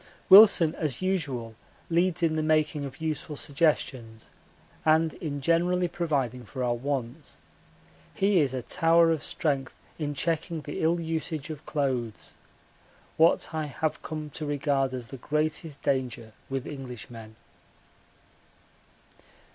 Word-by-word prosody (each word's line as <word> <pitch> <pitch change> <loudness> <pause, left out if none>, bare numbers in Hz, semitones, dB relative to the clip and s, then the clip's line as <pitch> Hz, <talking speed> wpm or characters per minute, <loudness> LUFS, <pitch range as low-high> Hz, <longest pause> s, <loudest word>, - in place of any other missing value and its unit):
Wilson 195 -5 +9
as 150 +1 -3
usual 140 -12 -1 0.3
leads 170 0 +1
in 160 -1 +2
the 155 - 0
making 155 -2 +1
of 135 +1 -9
useful 155 -1 -3
suggestions 135 -7 -1 0.5
and 160 0 +3
in 145 -3 -5
generally 175 +4 +2
providing 140 -8 -2
for 125 +4 -5
our 120 -1 +1
wants. 130 +2 -4 0.8
He 195 -1 +3
is 140 -5 +2
a 125 - -3
tower 165 +3 +4
of 160 -3 -1
strength 140 -4 -1 0.2
in 145 -2 -2
checking 165 +1 -2
the 145 0 -6
ill 165 +2 +2
usage 160 -2 -3
of 150 -1 -9
clothes 130 -7 -2 0.8
what 165 0 +3
I 155 -1 -2
have 150 +3 -2
come 155 -1 -6
to 155 - -6
regard 140 -2 0
as 120 -2 -7
the 135 - -8
greatest 155 +2 -2
danger 125 -5 -2 0.2
with 135 0 -3
Englishmen. 120 -5 -8
150 Hz, 130 wpm, -27 LUFS, 130-165 Hz, 0.8 s, Wilson